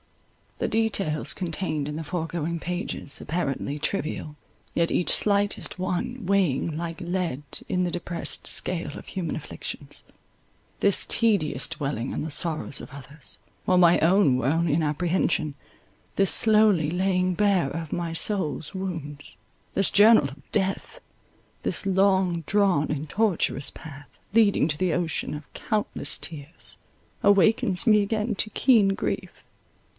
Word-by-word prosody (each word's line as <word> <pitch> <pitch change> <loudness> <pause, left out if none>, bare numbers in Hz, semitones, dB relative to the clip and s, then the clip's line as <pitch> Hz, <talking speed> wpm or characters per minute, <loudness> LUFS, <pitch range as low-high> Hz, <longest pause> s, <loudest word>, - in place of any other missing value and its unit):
The - - -1
details 200 -9 0
contained 165 -5 -3
in 150 - -5
the 160 - -4
foregoing 170 0 -3
pages, 175 -4 -3
apparently 145 -3 -3
trivial, 155 -3 -3 0.4
yet 170 0 +1
each 175 - +2
slightest 205 -2 +1
one 205 +6 -3
weighing 170 -6 +1
like 170 +1 -5
lead 175 -5 -2 0.2
in 180 0 0
the 180 - 0
depressed 175 -1 -2
scale 165 -5 0
of - - -11
human 180 -3 -4
afflictions; - - -7 0.8
this 200 -1 +2
tedious 165 - +2
dwelling 135 -4 -3
on - - -3
the 160 - -4
sorrows 155 -3 +1
of - - -11
others, 140 +2 -8 0.3
while 185 - +3
my 175 -1 +6
own 170 -6 +4
were 125 - -1
only 165 +1 +1
in 160 +2 +1
apprehension; 155 0 0 0.6
this 195 -2 +5
slowly 210 -8 +5
laying 185 +1 +1
bare 195 -6 +2
of 165 +1 -5
my 170 -1 -2
soul's 165 -3 -1
wounds: 155 - -6 0.4
this 195 - +2
journal 205 -8 +6
of 135 0 -16
death; 190 0 -1 0.6
this - - 0
long 190 -2 +2
drawn 195 -8 +2
and 150 +1 -3
tortuous 195 -9 0
path, 145 -2 -11 0.3
leading 210 -8 +4
to 150 -2 -2
the 180 0 0
ocean 170 -4 -1
of 150 0 -10
countless 215 -2 -2
tears, 155 0 -6 0.5
awakens 200 -1 +3
me 215 -3 +5
again 215 +2 -1
to 215 +2 -2
keen 225 -7 +4
grief. 195 - -4
175 Hz, 140 wpm, -25 LUFS, 150-195 Hz, 0.8 s, my